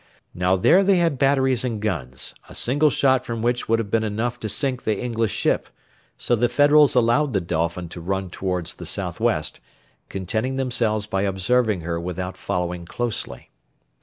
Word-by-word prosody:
Now 90 +1 +2
there 175 - +5
they 195 0 +4
had 165 -6 +1
batteries 135 -3 +2
and 115 -4 -2
guns, 65 - -3 0.2
a - - -11
single 145 +5 +3
shot 130 -2 +2
from 115 -1 -4
which 120 0 0
would 115 - +4
have 110 -3 -4
been 115 -1 +2
enough 115 +3 -2
to 110 - -4
sink 130 +4 -1
the 110 -2 0
English 115 -3 -1
ship; - - 0 0.5
so 120 - +1
the 120 +1 +1
Federals 145 -1 +5
allowed 125 +4 +3
the 100 - +2
Dolphin 85 0 -2
to 85 - -8
run 95 +1 -3
towards 90 -3 -2
the - - -9
south - - -3
west, - - 0 0.5
contenting 110 +7 -2
themselves 120 -5 0
by 95 -2 -1
observing 100 +1 +1
her 85 0 -3
without 90 +2 -4
following 90 -1 -3
closely. 120 +5 -4
110 Hz, 175 wpm, -23 LUFS, 90-125 Hz, 0.5 s, there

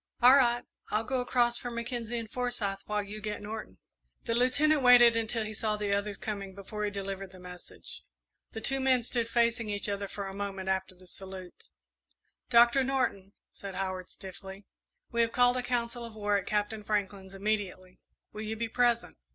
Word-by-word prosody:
"All 250 +3 +9
right 240 -3 +4 0.3
I'll 215 +1 +1
go 255 +2 -1
across 240 -1 +2
for 245 - -4
Mackenzie 235 0 -3
and 230 -1 -4
Forsyth, 225 -4 -2
while 210 -1 0
you 210 +2 -7
get 210 0 -3
Norton." 210 - -7 0.5
The 230 - 0
Lieutenant 280 +5 +3
waited 245 -2 +8
until 225 0 0
he 215 - -5
saw 215 0 -1
the 205 -1 0
others 200 0 -2
coming 200 -3 -5
before 205 +2 -6
he 210 - +1
delivered 195 -1 -5
the 185 - -13
message. 180 -1 -10 0.5
The 220 - -5
two 270 +4 0
men 260 -2 +3
stood 235 -1 -1
facing 230 -1 +1
each 205 0 0
other 200 0 -2
for 200 0 -5
a 195 - -6
moment 195 -1 -4
after 190 -1 -1
the 185 +1 -17
salute. 190 0 -9 0.8
"Doctor 240 +2 +6
Norton," 250 -7 -1 0.2
said 195 -2 -8
Howard, 185 -1 -3
stiffly, 190 +1 -10 0.5
"we 235 - +2
have 230 0 +2
called 245 0 +4
a - - +1
council 240 -1 -2
of 230 -2 -9
war 205 -1 0
at 200 - -1
Captain 210 0 -1
Franklin's, 200 -2 -2
immediately. 195 -3 -2 0.3
Will 210 - -6
you 220 0 -3
be 230 +1 -3
present?" 240 0 +1
215 Hz, 185 wpm, -30 LUFS, 195-240 Hz, 0.8 s, All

